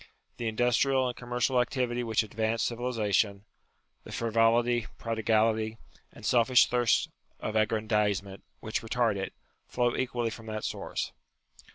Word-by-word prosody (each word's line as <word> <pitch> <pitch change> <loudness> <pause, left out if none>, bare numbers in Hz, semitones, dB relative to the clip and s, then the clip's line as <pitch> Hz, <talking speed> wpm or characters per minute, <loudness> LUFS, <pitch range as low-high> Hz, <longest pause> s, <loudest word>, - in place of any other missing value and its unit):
The 120 - -3
industrial 125 +3 +2
and 125 - -3
commercial 125 +1 +1
activity 125 -1 -1
which 110 -1 +1
advance 110 +1 -1
civilization, 110 -4 0 0.6
the - - -11
frivolity, 115 +1 +2
prodigality, 110 -1 +1 0.3
and - - -12
selfish 125 +1 +5
thirst 120 -2 +2 0.3
of 110 - -4
aggrandizement 105 -2 0 0.2
which 110 - -2
retard 115 -1 +1
it, 95 -1 -3 0.4
flow 120 -1 0
equally 120 -2 -1
from 115 0 -10
that 110 -1 -4
source. - - -3
115 Hz, 125 wpm, -29 LUFS, 110-120 Hz, 0.6 s, selfish